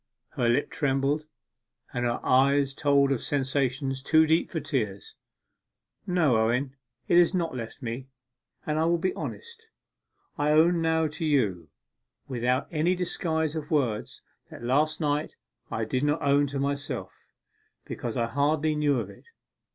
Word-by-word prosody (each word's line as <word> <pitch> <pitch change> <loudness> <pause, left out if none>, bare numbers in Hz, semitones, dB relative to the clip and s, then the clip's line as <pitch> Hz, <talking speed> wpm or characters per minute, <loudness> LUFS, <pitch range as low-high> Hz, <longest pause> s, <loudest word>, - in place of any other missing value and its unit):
Her 120 - 0
lip 125 +5 +1
trembled; 140 +2 0 0.7
her 120 -1 -1
eye 140 +2 +4
told 140 -1 +3
of 135 - 0
sensations 135 -1 -1
too 160 +3 +4
deep 160 +2 +2
for 165 - -3
tears. 105 -11 -3 0.9
'No, 165 -10 +3
Owen, 125 +5 0 0.3
it 175 - +5
has 175 +2 +4
not 165 -6 -1
left 115 +2 -7
me; 120 +3 -5 0.6
and 155 0 -1
I 160 - +2
will 170 +1 +3
be 185 +3 -1
honest. 465 -1 -8 0.7
I 150 +1 +2
own 165 +2 +4
now 160 0 +2
to 150 +1 -4
you, 105 - +1 0.6
without 125 +1 0
any 170 +3 +1
disguise 160 -3 -1
of 155 -1 -5
words, 130 -10 -1 0.3
what - - -11
last 150 +7 +1
night 150 0 -1 0.3
I 110 - -2
did 130 +4 -1
not 145 0 +1
own 145 0 +3
to 140 0 -4
myself, 140 +1 -3 0.7
because 120 -1 -5
I 120 - +1
hardly 145 +5 +1
knew 145 -3 +1
of - - -4
it. - - -18
145 Hz, 150 wpm, -27 LUFS, 130-155 Hz, 0.9 s, it